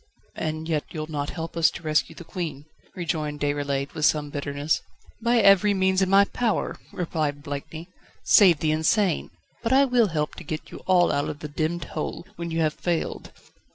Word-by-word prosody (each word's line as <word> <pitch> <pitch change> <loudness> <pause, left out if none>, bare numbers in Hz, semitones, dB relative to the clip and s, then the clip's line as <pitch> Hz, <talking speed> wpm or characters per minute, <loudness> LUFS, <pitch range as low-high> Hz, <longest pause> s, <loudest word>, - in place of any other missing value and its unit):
"And 155 0 -4
yet 155 -3 0
you'll 155 -1 -6
not 145 -1 -2
help 165 -1 -6
us 165 -1 +4
to - - -10
rescue 155 -1 0
the - - -9
Queen?" 160 -5 -5 0.3
rejoined 155 -4 -2
Déroulède, 145 -1 -1
with 155 - -4
some 150 -1 +2
bitterness. 145 +1 -1 0.4
"By 235 +1 +3
every 200 -1 +5
means 190 0 +2
in 190 - +2
my 200 +1 +6
power," 230 +1 -1 0.2
replied 155 -5 -2
Blakeney, 150 +3 -6 0.4
"save 180 -7 +6
the 155 - +2
insane. 160 +4 +1 0.3
But 230 +2 0
I 275 +1 +6
will 245 -4 +3
help 150 -4 -2
to - - -8
get 155 +1 -6
you - - -8
all 180 -2 +4
out 145 +1 0
of 145 - -7
the 150 - -4
demmed 155 +3 -2
hole, 155 +2 -5
when 170 -2 -5
you 165 0 -1
have 155 -1 +2
failed." 170 0 -3
160 Hz, 190 wpm, -25 LUFS, 150-185 Hz, 0.4 s, my